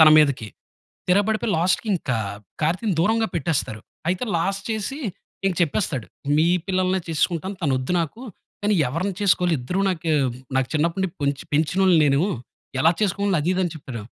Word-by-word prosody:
తన 160 Hz, -, +10 dB
మీదకి. 140 Hz, -7 st, +3 dB, 0.6 s
తిరగబడిపోయి 210 Hz, +3 st, +2 dB
లాస్ట్‌కి 185 Hz, +6 st, +1 dB
ఇంకా 130 Hz, -9 st, -1 dB, 0.4 s
కార్తీని 180 Hz, +7 st, +1 dB
దూరంగా 225 Hz, +5 st, +2 dB
పెట్టేస్తారు. 150 Hz, -10 st, -1 dB, 0.3 s
అయితే 185 Hz, +7 st, 0 dB
లాస్ట్ 195 Hz, +4 st, -1 dB
చేసి 220 Hz, +6 st, -3 dB, 0.5 s
ఇంక 190 Hz, -, +2 dB
చెప్పేస్తాడు. 150 Hz, -, -1 dB, 0.3 s
మీ 160 Hz, +2 st, +4 dB, 0.2 s
పిల్లల్నే 185 Hz, 0 st, +1 dB
చేసుకుంటాను. 170 Hz, +4 st, -1 dB
తనోద్దు 130 Hz, -1 st, 0 dB
నాకు. 165 Hz, +8 st, -4 dB, 0.4 s
కానీ 205 Hz, 0 st, +2 dB
ఎవరిని 175 Hz, +9 st, -2 dB
చేసుకోవాలి 180 Hz, -4 st, +3 dB
ఇద్దరు 180 Hz, +11 st, -2 dB
నాకు 170 Hz, -3 st, -1 dB, 0.5 s
నాకు 135 Hz, -1 st, +1 dB
చిన్నప్పటి 165 Hz, +5 st, +1 dB
నుంచి 175 Hz, -, -4 dB
పొంచి 140 Hz, 0 st, -1 dB
పెంచినోల్ని 175 Hz, +4 st, +3 dB
నేను. 140 Hz, 0 st, +3 dB, 0.6 s
ఎలా 165 Hz, -, +6 dB
చేసుకోవాలి 200 Hz, -2 st, +1 dB
అది 165 Hz, -, 0 dB
ఇది 190 Hz, -, 0 dB
అని 175 Hz, -, -2 dB
చెప్పాడు. 130 Hz, -6 st, -7 dB
175 Hz, 150 wpm, -23 LUFS, 150-195 Hz, 0.6 s, తన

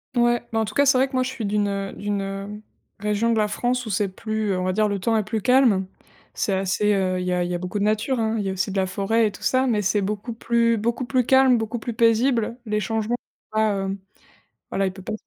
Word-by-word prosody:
Ouais, 240 Hz, 0 st, +3 dB
bah, 225 Hz, -, 0 dB
en 220 Hz, -, +1 dB
tout -, -, -7 dB
cas, 285 Hz, -, +3 dB
c'est 265 Hz, -2 st, +5 dB
vrai 265 Hz, +1 st, +3 dB
que 265 Hz, -, -20 dB
moi, 255 Hz, -, +2 dB
je 255 Hz, -, -3 dB
suis 245 Hz, -4 st, -5 dB
d'une, 205 Hz, 0 st, +1 dB
heu, 195 Hz, -1 st, -3 dB
d'une, 205 Hz, -1 st, -2 dB
hem, 195 Hz, +2 st, -6 dB, 0.4 s
région 210 Hz, +3 st, 0 dB
de 230 Hz, -, +1 dB
la 210 Hz, -1 st, +2 dB
France 245 Hz, +4 st, -1 dB
où -, -, -5 dB
c'est 200 Hz, +1 st, +1 dB
plus, 215 Hz, +2 st, -3 dB
heu, 185 Hz, -, 0 dB
on -, -, -2 dB
va 185 Hz, 0 st, 0 dB
dire, 215 Hz, +2 st, +2 dB
le 200 Hz, -1 st, -2 dB
temps 225 Hz, +4 st, +1 dB
est 215 Hz, -, +1 dB
plus 215 Hz, +1 st, -3 dB
calme. 245 Hz, -6 st, +4 dB, 0.5 s
C'est 200 Hz, -, -1 dB
assez, 195 Hz, +2 st, +1 dB
heu, 185 Hz, -2 st, 0 dB
il 180 Hz, -, -3 dB
y 180 Hz, -, +1 dB
a 180 Hz, 0 st, +1 dB
il 175 Hz, -, -3 dB
y -, -, -1 dB
a -, -, 0 dB
beaucoup 180 Hz, +3 st, -4 dB
de -, -, 0 dB
nature, 215 Hz, +5 st, 0 dB
hein, 220 Hz, 0 st, 0 dB
il 205 Hz, -, -2 dB
y -, -, -1 dB
a -, -, -2 dB
aussi 190 Hz, +1 st, -2 dB
de 195 Hz, -, -3 dB
la 190 Hz, -, +2 dB
forêt 210 Hz, +5 st, +1 dB
et -, -, -3 dB
tout 195 Hz, -, -13 dB
ça 260 Hz, 0 st, +2 dB
mais 225 Hz, -5 st, +1 dB
c'est 205 Hz, +1 st, +1 dB
beaucoup 210 Hz, +4 st, -3 dB
plus 230 Hz, 0 st, +1 dB
beaucoup 235 Hz, +4 st, -1 dB
plus 250 Hz, -1 st, +1 dB
calme, 265 Hz, -1 st, +5 dB
beaucoup 225 Hz, +1 st, -3 dB
plus 235 Hz, +1 st, -5 dB
paisible, 230 Hz, 0 st, +2 dB
les 210 Hz, 0 st, 0 dB
changements, 220 Hz, +3 st, -1 dB
tu 215 Hz, -2 st, -7 dB
vois? 215 Hz, -1 st, +3 dB
Heu, 195 Hz, +1 st, -3 dB, 0.7 s
voilà 195 Hz, -, 0 dB
il 190 Hz, -, -1 dB
peut 190 Hz, +1 st, -12 dB
pas 200 Hz, -, -5 dB
215 Hz, 285 wpm, -23 LUFS, 195-235 Hz, 0.7 s, c'est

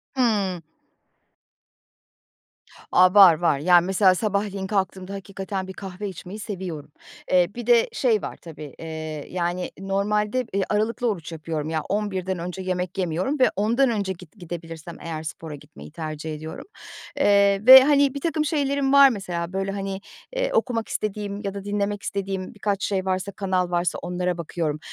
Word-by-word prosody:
Hımm. 205 Hz, -8 st, +1 dB, 2.3 s
A, 180 Hz, 0 st, +5 dB
var 195 Hz, -4 st, +9 dB
var. 160 Hz, -5 st, +2 dB
Yani, 175 Hz, +2 st, +5 dB
mesela 190 Hz, 0 st, +4 dB
sabahleyin 200 Hz, -1 st, -2 dB
kalktığımda 190 Hz, -1 st, -2 dB
hakikaten 195 Hz, 0 st, -5 dB
bir 190 Hz, -, -7 dB
kahve 195 Hz, +1 st, -6 dB
içmeyi 190 Hz, +3 st, -9 dB
seviyorum. 185 Hz, -8 st, -6 dB, 0.4 s
Eee, 180 Hz, -1 st, +4 dB
bir 240 Hz, -1 st, -6 dB
de 235 Hz, -1 st, +5 dB
şey 225 Hz, -6 st, +2 dB
var -, -, -5 dB
tabii, 155 Hz, -4 st, -10 dB
eee, 155 Hz, -2 st, -6 dB
yani, 175 Hz, 0 st, -2 dB
normalde, 210 Hz, +5 st, 0 dB
eee, 200 Hz, -, +1 dB
aralıklı 225 Hz, +3 st, 0 dB
oruç 170 Hz, -5 st, -4 dB
yapıyorum, 155 Hz, -1 st, -4 dB
ya, 160 Hz, -1 st, -1 dB
11'den 190 Hz, -3 st, -2 dB
önce 180 Hz, +2 st, -5 dB
yemek 185 Hz, -1 st, -3 dB
yemiyorum 185 Hz, -, -1 dB
ve 255 Hz, -, +5 dB
10'dan 235 Hz, +6 st, +2 dB
önce, 200 Hz, -4 st, -1 dB
git 180 Hz, -2 st, -15 dB
gidebilirsem 165 Hz, -1 st, -8 dB
eğer, 160 Hz, -2 st, -5 dB
spora 160 Hz, -1 st, -7 dB
gitmeyi 75 Hz, -, -13 dB
tercih 155 Hz, 0 st, -5 dB
ediyorum. 155 Hz, +1 st, -8 dB, 0.5 s
Eee, 200 Hz, -1 st, +4 dB
ve 260 Hz, 0 st, +12 dB
,hani, 280 Hz, -1 st, +4 dB
birtakım 305 Hz, +2 st, -1 dB
şeylerim 280 Hz, -3 st, 0 dB
var, 280 Hz, -1 st, +9 dB
mesela. 180 Hz, -5 st, -4 dB
Böyle, 195 Hz, 0 st, -1 dB
hani, 195 Hz, -1 st, -4 dB, 0.3 s
eee, -, -, 0 dB
okumak 245 Hz, -, 0 dB
istediğim 205 Hz, -1 st, -3 dB
ya 195 Hz, -, -3 dB
da 200 Hz, -1 st, -6 dB
dinlemek 205 Hz, 0 st, -2 dB
istediğim 195 Hz, 0 st, -4 dB
birkaç 205 Hz, -2 st, -2 dB
şey 190 Hz, -2 st, -1 dB
varsa, 190 Hz, +1 st, -1 dB
kanal 185 Hz, -3 st, -1 dB
varsa, 175 Hz, 0 st, 0 dB
onlara 180 Hz, 0 st, -2 dB
bakıyorum. 160 Hz, -2 st, -3 dB
190 Hz, 155 wpm, -24 LUFS, 175-210 Hz, 2.3 s, ve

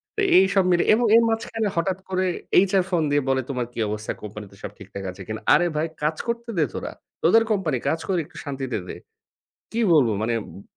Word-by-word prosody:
তো 435 Hz, -, -1 dB, 0.2 s
এইসব 190 Hz, 0 st, +4 dB
মিলে 175 Hz, -, +3 dB
এবং 235 Hz, +2 st, +2 dB
এর 230 Hz, -, +6 dB
মাঝখানে 225 Hz, -1 st, -1 dB
হঠাৎ 180 Hz, +2 st, 0 dB
করে 185 Hz, 0 st, 0 dB, 0.4 s
HR 190 Hz, -2 st, +3 dB
ফোন 175 Hz, -3 st, +1 dB
দিয়ে 145 Hz, -1 st, +2 dB
বলে, 130 Hz, 0 st, +2 dB
"তোমার 125 Hz, -3 st, -2 dB
কী -, -, -7 dB
অবস্থা? 105 Hz, +1 st, -4 dB
কোম্পানিতে 105 Hz, -1 st, -9 dB
সব -, -, -5 dB
ঠিকঠাক 100 Hz, -1 st, -9 dB
আছে 95 Hz, -, -12 dB
কিনা?" 110 Hz, +1 st, -5 dB
আরে 175 Hz, -, +4 dB
ভাই, 155 Hz, +2 st, 0 dB, 0.2 s
কাজ 155 Hz, +1 st, +1 dB
করতে 235 Hz, 0 st, -3 dB
দে 155 Hz, -, +3 dB
তোরা। -, -, -5 dB, 0.3 s
তোদের 225 Hz, +7 st, +5 dB
কোম্পানি। 170 Hz, -10 st, 0 dB
কাজ 160 Hz, -, 0 dB
করি 185 Hz, -3 st, +1 dB
একটু -, -, -16 dB
শান্তিতে 135 Hz, -4 st, -4 dB
দে। -, -, -7 dB, 0.7 s
কী 230 Hz, -, -2 dB
বলবো? 130 Hz, -8 st, +4 dB
মানে, 115 Hz, +1 st, 0 dB, 0.2 s
উব 100 Hz, -, -12 dB
160 Hz, 205 wpm, -23 LUFS, 120-195 Hz, 0.7 s, এর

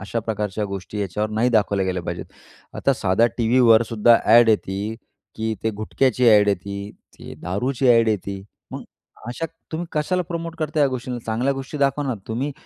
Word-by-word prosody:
अशा 110 Hz, +4 st, -3 dB
प्रकारच्या 105 Hz, -1 st, -3 dB
गोष्टी 100 Hz, +1 st, -6 dB
याच्यावर 105 Hz, +2 st, -2 dB
नाही 110 Hz, +3 st, +1 dB
दाखवल्या 100 Hz, -4 st, +1 dB
गेल्या 90 Hz, -1 st, -2 dB
पाहिजेत. 85 Hz, 0 st, -5 dB, 0.5 s
आता 140 Hz, -, +2 dB
साध्या 100 Hz, +2 st, +2 dB
टीव्हीवरसुद्धा 115 Hz, -1 st, +4 dB
ॲड 115 Hz, +1 st, +6 dB
येते 105 Hz, 0 st, 0 dB, 0.4 s
की 110 Hz, 0 st, -2 dB
ते 110 Hz, -, +1 dB
गुटख्याची 125 Hz, +4 st, 0 dB
ॲड 105 Hz, -2 st, +6 dB
येते, 100 Hz, +1 st, -3 dB, 0.2 s
ती -, -, -10 dB
दारूची 125 Hz, +9 st, -1 dB
ॲड 115 Hz, -2 st, +5 dB
येते. 100 Hz, -2 st, -3 dB, 0.3 s
मग -, -, -6 dB, 0.5 s
अशा 165 Hz, +7 st, -3 dB, 0.3 s
तुम्ही 170 Hz, +2 st, -3 dB
कशाला 180 Hz, +4 st, 0 dB
प्रमोट 165 Hz, -1 st, -5 dB
करता 155 Hz, 0 st, -1 dB
या 140 Hz, -, +5 dB
गोष्टींना? 125 Hz, -1 st, -4 dB
चांगल्या 120 Hz, +5 st, 0 dB
गोष्टी 135 Hz, +2 st, -6 dB
दाखवा 140 Hz, +1 st, +1 dB
ना. 130 Hz, -, -1 dB
तुम्ही 130 Hz, +6 st, -2 dB
115 Hz, 165 wpm, -22 LUFS, 105-130 Hz, 0.5 s, ॲड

